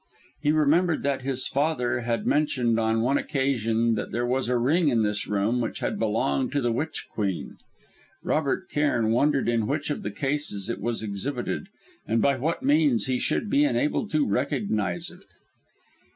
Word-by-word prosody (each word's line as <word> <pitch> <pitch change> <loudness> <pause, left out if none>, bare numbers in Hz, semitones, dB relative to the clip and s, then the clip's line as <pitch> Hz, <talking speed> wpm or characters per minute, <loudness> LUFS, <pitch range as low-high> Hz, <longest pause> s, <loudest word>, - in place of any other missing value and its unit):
He 145 - +2
remembered 155 +2 +2
that 140 -1 0
his 130 0 +1
father 130 -4 0
had 115 -1 -2
mentioned 125 -6 +1
on 110 0 +1
one 135 +4 +2
occasion 115 -5 0
that 110 - -3
there 120 +1 -1
was 125 0 0
a 125 - +2
ring 150 +8 +2
in 115 -4 +2
this 105 0 -1
room 105 +4 +1
which 115 - -3
had - - -2
belonged 70 0 0
to 145 - +1
the 120 -2 +1
Witch 155 +7 -3
Queen. 100 -4 -3 0.7
Robert 145 -3 0
Cairn 120 -7 +1
wondered 140 +3 +2
in 115 -2 +1
which 145 +2 -2
of - - -3
the - - -3
cases 135 -3 -2
it 95 - -5
was 115 +1 -2
exhibited, 120 - -3 0.4
and 115 - +1
by 140 +2 +3
what 155 +6 -2
means 145 -6 +3
he 130 -1 0
should - - 0
be 280 +7 +3
enabled 290 -6 0
to 155 -1 +3
recognise 105 - -1
it. - - -16
125 Hz, 175 wpm, -26 LUFS, 115-145 Hz, 0.7 s, by